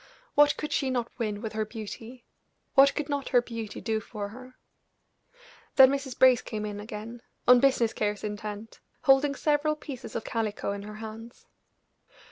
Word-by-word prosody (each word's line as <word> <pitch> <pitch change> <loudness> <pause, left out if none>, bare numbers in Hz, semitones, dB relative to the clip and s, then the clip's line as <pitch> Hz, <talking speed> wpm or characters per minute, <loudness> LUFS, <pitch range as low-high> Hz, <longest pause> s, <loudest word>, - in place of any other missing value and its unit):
What 290 0 +5
could 300 - -4
she 270 - +1
not 245 -2 -2
win 210 -2 -2
with 220 - -4
her 215 0 0
beauty 225 +3 -8 0.5
what 275 +1 +6
could 300 - -2
not 285 -2 -2
her 245 - +5
beauty 230 -3 -6
do 220 -2 -1
for 205 -1 -6
her. 255 +3 -12 1.2
Then 265 -1 +8
Mrs. 275 -2 -3
Brace 255 -2 +6
came 215 -2 -5
in 205 -1 -5
again 215 +3 -8 0.3
on 250 0 +8
business 245 -4 +3
cares 210 -1 -2
intent, 210 +1 -6 0.2
holding 280 0 +4
several 300 +1 +1
pieces 280 -4 -8
of 225 - -2
calico 220 -3 -2
in 200 0 -4
her 210 +1 -8
hands. 225 +2 -9
230 Hz, 165 wpm, -28 LUFS, 215-265 Hz, 1.2 s, Then